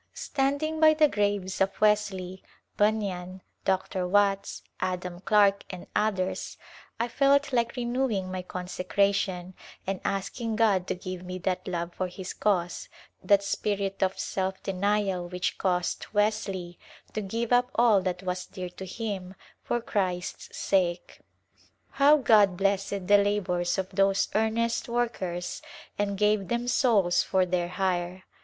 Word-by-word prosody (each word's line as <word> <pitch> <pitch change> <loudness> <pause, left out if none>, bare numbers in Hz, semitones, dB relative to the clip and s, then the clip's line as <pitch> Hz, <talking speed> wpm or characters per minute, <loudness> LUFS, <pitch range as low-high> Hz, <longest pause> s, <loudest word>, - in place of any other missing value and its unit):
Standing 285 +3 -1
by 310 0 +6
the 305 0 +5
graves 205 -6 -1
of 195 0 +1
Wesley, 200 -3 +1 0.3
Bunyan, 190 -4 -1 0.2
Dr. 190 -1 0
Watts, 200 +1 +1 0.2
Adam 180 -1 -3
Clarke 200 0 +3
and 185 -2 -8
others 190 -3 -1 0.4
I 235 - +1
felt 280 +3 +2
like 235 -1 +1
renewing 240 -6 -1
my 185 0 -3
consecration 185 0 -1 0.3
and 195 -1 -3
asking 220 +4 -2
God 205 -5 +2
to - - -1
give 185 0 -6
me 180 0 -6
that 185 0 -2
love 170 -1 -3
for 185 - -2
His 180 +1 -7
cause, 180 -4 -1 0.3
that 200 +1 +4
spirit 200 -1 -2
of 190 0 +1
self 190 0 -3
denial 195 -2 0
which 180 0 -2
caused 180 -2 -1
Wesley 200 -5 -1 0.3
to 215 - -2
give 230 +4 -2
up 245 0 +4
all 230 -4 +5
that 180 0 -3
was 180 0 -3
dear 180 -1 -6
to 185 +2 -9
him 195 -2 -5 0.3
for 240 - 0
Christ's 185 -6 -3
sake. 180 -3 0 0.7
How 285 +2 +5
God 210 -9 +4
blessed 195 0 0
the 205 +2 +6
labors 180 -4 0
of 190 -1 -2
those 195 0 +2
earnest 225 +2 0
workers 195 -7 -2 0.3
and 200 -1 -1
gave 210 -1 +2
them 240 +1 -1
souls 215 -9 +3
for 190 -1 +1
their 175 -1 0
hire 180 0 -2
195 Hz, 140 wpm, -27 LUFS, 185-215 Hz, 0.7 s, by